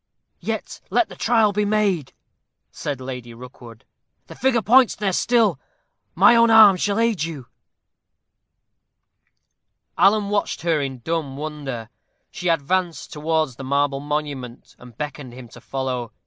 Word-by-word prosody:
"Yet - - -5
let 350 - +1
the - - -11
trial 225 -3 +2
be 210 +1 0
made," 205 -8 0 0.6
said 145 -3 -5
Lady 125 -2 -8
Rookwood; 120 -2 -13 0.4
"the - - -11
figure 245 -3 +1
points 250 +3 +5
there 200 -3 -1
still 230 +2 +2 0.6
my 235 - +6
own 230 0 +5
arm 220 -3 +8
shall 200 +3 -1
aid 230 -5 +1
you." 155 -6 -6 2.5
Alan 205 0 +4
watched 205 -4 -1
her 165 -3 +1
in 135 -3 -5
dumb 155 -3 -3
wonder. 140 -7 -6 0.4
She 180 - -3
advanced 170 +2 -1
towards 155 -4 -1
the 135 - -8
marble 140 +1 0
monument, 145 -4 -5
and 125 -2 -15
beckoned 145 -4 -6
him 125 -1 -10
to - - -14
follow. 130 -3 -4
150 Hz, 135 wpm, -22 LUFS, 130-205 Hz, 2.5 s, arm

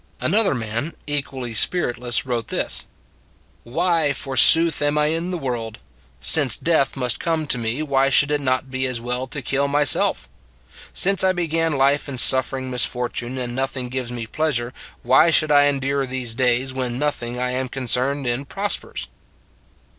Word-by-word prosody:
Another 210 -8 +1
man 115 +6 -4
equally 135 -4 -3
spiritless 120 -3 -1
wrote 120 -3 -3
this: - - -2 0.4
" - - -36
Why, 165 +3 0
forsooth, 145 +4 +4
am 145 +1 +1
I 150 - +3
in 165 +2 -2
the 180 - -3
world? 120 -7 -5 0.4
Since 135 - +4
death 160 -5 0
must 125 -3 -1
come 165 -2 -1
to 125 -4 +1
me, 115 +6 -3
why 135 -2 +1
should 145 +1 +3
it 145 -1 0
not 130 0 -1
be 130 0 +1
as 125 -2 -3
well 125 +2 -3
to 140 0 -6
kill 140 +2 0
myself.... 145 0 +2 0.6
Since 195 0 +3
I 190 0 +3
began 165 -2 -1
life 140 +2 +1
in 135 - -6
suffering 130 +1 +3
misfortune 125 0 -1
and 125 -1 -4
nothing 130 -1 -3
gives 125 -1 -3
me 120 -2 -5
pleas 155 +3 -1
ure, 120 +1 -5 0.3
why 135 +7 +4
should 155 -1 +4
I 145 -1 +5
endure 140 -1 -1
these 125 -3 -3
days, 125 +2 +1
when 125 -2 -3
noth 150 0 -2
ing 120 +1 -5
I 125 0 -1
am 130 0 -3
concerned 130 +2 -2
in 120 +3 -2
prospers? 200 +8 -3
135 Hz, 170 wpm, -21 LUFS, 125-150 Hz, 0.6 s, I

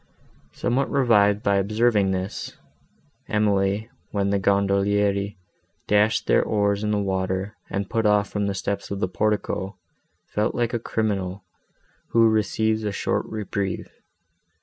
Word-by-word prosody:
Somewhat 125 +3 0
revived 105 -6 +3
by 100 0 +3
observing 105 0 +2
this, 95 +1 -4 0.7
Emily, 105 +1 +1 0.2
when 100 -1 0
the 100 - +2
gondolieri 100 +1 +1 0.5
dashed 105 +1 +2
their - - +4
oars 100 -1 0
in 105 - 0
the 105 - +1
water, 95 0 -2
and 100 0 -2
put 115 +1 +1
off 105 -1 +3
from 105 -1 -2
the 100 - -2
steps 100 +1 -3
of 100 - -4
the 95 - 0
portico, 100 -1 -1 0.5
felt 105 +1 -1
like 120 0 0
a 120 - 0
criminal, 100 -5 -2 0.7
who 115 -1 +6
receives 110 0 +1
a 105 - -1
short - - -1
reprieve. 100 -3 -3
100 Hz, 135 wpm, -24 LUFS, 100-110 Hz, 0.7 s, who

